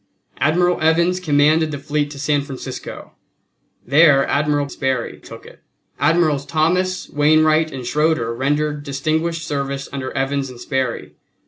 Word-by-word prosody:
Admiral 175 Hz, +4 st, +2 dB
Evans 170 Hz, +3 st, +2 dB
commanded 155 Hz, -1 st, +3 dB
the 145 Hz, -, -4 dB
fleet 145 Hz, +1 st, -2 dB
to 145 Hz, -, -10 dB
San 145 Hz, +1 st, 0 dB
Francisco; 140 Hz, -2 st, -8 dB, 0.7 s
there 140 Hz, 0 st, +5 dB
Admiral 145 Hz, 0 st, 0 dB
Sperry 130 Hz, -3 st, -3 dB
took -, -, -12 dB
it; -, -, -15 dB, 0.4 s
Admirals 150 Hz, -1 st, +2 dB
Thomas, 170 Hz, +6 st, 0 dB
Wainwright 155 Hz, +1 st, +3 dB
and 130 Hz, -2 st, -7 dB
Schroeder 150 Hz, -3 st, 0 dB
rendered 145 Hz, +4 st, -1 dB
distinguished 155 Hz, +4 st, -2 dB
service 140 Hz, -1 st, -3 dB
under 130 Hz, -2 st, -4 dB
Evans 135 Hz, 0 st, -1 dB
and 125 Hz, -1 st, -11 dB
Sperry. 130 Hz, -1 st, -3 dB
145 Hz, 130 wpm, -19 LUFS, 140-155 Hz, 0.7 s, there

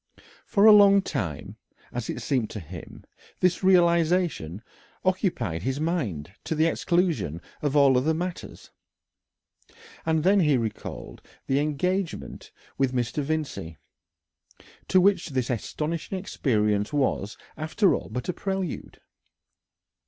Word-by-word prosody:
For 200 Hz, +1 st, +3 dB
a 220 Hz, -, +10 dB
long 200 Hz, -1 st, +7 dB
time, 95 Hz, -, -4 dB, 0.4 s
as 120 Hz, -2 st, -4 dB
it -, -, -4 dB
seemed 130 Hz, -8 st, 0 dB
to 105 Hz, -, -6 dB
him, 85 Hz, -1 st, -10 dB, 0.4 s
this 180 Hz, +1 st, +1 dB
realisation 170 Hz, -, +2 dB, 0.4 s
occupied 170 Hz, -, 0 dB
his 130 Hz, +6 st, -2 dB
mind 115 Hz, -, -2 dB
to 160 Hz, -, -2 dB
the 155 Hz, +1 st, +3 dB
exclusion 170 Hz, -, 0 dB, 0.2 s
of 145 Hz, -1 st, -1 dB
all 140 Hz, -2 st, +6 dB
other 150 Hz, +6 st, +2 dB
matters, 175 Hz, +2 st, -6 dB, 1.3 s
and 160 Hz, -1 st, +1 dB
then 195 Hz, +3 st, +4 dB
he 150 Hz, -6 st, +3 dB
recalled 115 Hz, -3 st, -5 dB, 0.2 s
the 135 Hz, +1 st, +1 dB
engagement 170 Hz, +5 st, -2 dB, 0.3 s
with 130 Hz, -1 st, +1 dB
Mr. 125 Hz, +4 st, -1 dB
Vincey, 145 Hz, -, -3 dB, 1.1 s
to 185 Hz, -, +4 dB
which 185 Hz, -2 st, +3 dB
this 130 Hz, -3 st, -1 dB
astonishing 155 Hz, -, -3 dB
experience 105 Hz, -, 0 dB
was, 130 Hz, -7 st, -1 dB, 0.2 s
after 165 Hz, +6 st, +2 dB
all, -, -, -3 dB
but 125 Hz, -, -5 dB
a 180 Hz, -, -1 dB
prelude. 190 Hz, -4 st, -4 dB
155 Hz, 125 wpm, -26 LUFS, 120-180 Hz, 1.3 s, a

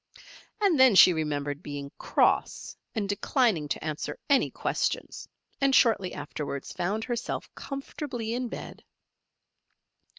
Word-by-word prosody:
And 390 Hz, -8 st, +3 dB
then 260 Hz, -5 st, +7 dB
she 185 Hz, -, +9 dB
remembered 145 Hz, -2 st, -2 dB
being 145 Hz, -3 st, -6 dB
"cross" -, -, +1 dB, 0.2 s
and 210 Hz, -3 st, -1 dB
declining 205 Hz, -, +1 dB
to -, -, -3 dB
answer 155 Hz, -1 st, -4 dB
any 275 Hz, -, +4 dB
questions, -, -, -2 dB, 0.3 s
and 275 Hz, -1 st, +4 dB
shortly 210 Hz, -6 st, +4 dB
afterwards 145 Hz, -1 st, -5 dB
found 205 Hz, +5 st, -2 dB
herself 240 Hz, 0 st, -4 dB
comfortably 275 Hz, -4 st, -5 dB
in 250 Hz, +1 st, -2 dB
bed. -, -, -8 dB
205 Hz, 120 wpm, -28 LUFS, -, 0.3 s, she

